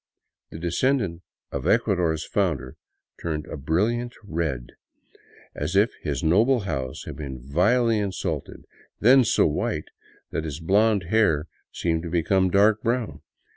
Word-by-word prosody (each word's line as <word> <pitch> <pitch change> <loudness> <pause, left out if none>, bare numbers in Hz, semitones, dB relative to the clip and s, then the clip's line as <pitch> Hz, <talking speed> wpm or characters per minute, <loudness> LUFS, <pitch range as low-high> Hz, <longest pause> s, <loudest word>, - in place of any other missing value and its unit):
The - - -9
descendant 90 - 0 0.3
of - - -3
Ecuador's 90 -9 +1
founder 75 -11 -1 0.5
turned 75 -3 -3
a - - -7
brilliant 110 - -1
red, 80 -10 -3 0.8
as 75 +5 -3
if 105 +4 +4
his 70 -4 -3
noble 110 +10 +3
house 65 -9 -4
had - - -7
been 65 -4 -6
vilely 105 - +2
insulted, 100 -3 -4 0.3
then 130 +4 +6
so - - +3
white 75 - -1 0.4
that 80 - -2
his 75 -1 -5
blond 100 +3 +3
hair 95 -9 +3 0.3
seemed 80 -2 -1
to 85 - -6
become 90 +3 +2
dark 105 +3 +4
brown. 120 -1 -2
90 Hz, 135 wpm, -25 LUFS, 80-110 Hz, 0.8 s, then